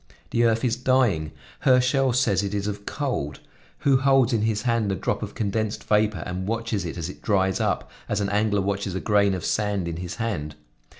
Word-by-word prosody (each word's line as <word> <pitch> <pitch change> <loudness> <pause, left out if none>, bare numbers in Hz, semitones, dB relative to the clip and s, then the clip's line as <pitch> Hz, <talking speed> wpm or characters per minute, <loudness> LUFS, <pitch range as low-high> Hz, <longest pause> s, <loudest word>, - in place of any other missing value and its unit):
The 120 0 +3
earth 115 +2 +2
is 120 -2 +1
dying; 120 - +2 0.3
Herschell 130 - +3
says 110 -7 +2
it 100 0 -3
is 100 -1 -1
of 105 0 -5
cold; 125 - -3 0.4
who 135 -2 +4
holds 135 -2 +3
in 110 - +2
his 105 -1 0
hand 115 -4 +1
the 95 - 0
drop - - -2
of - - -6
condensed 110 +1 -2
vapor 105 -4 +1
and 90 +1 -4
watches 115 -3 -2
it 85 - -5
as 85 -2 -3
it 95 - -9
dries 95 -3 +1
up, - - -1 0.2
as 105 - 0
an 100 -1 0
angler 105 0 +1
watches 100 -1 -2
a - - -1
grain 100 -2 +2
of 90 - -5
sand 105 -4 0
in 85 -1 -4
his 90 +1 -5
hand? 90 -11 -3
105 Hz, 205 wpm, -25 LUFS, 95-115 Hz, 0.4 s, who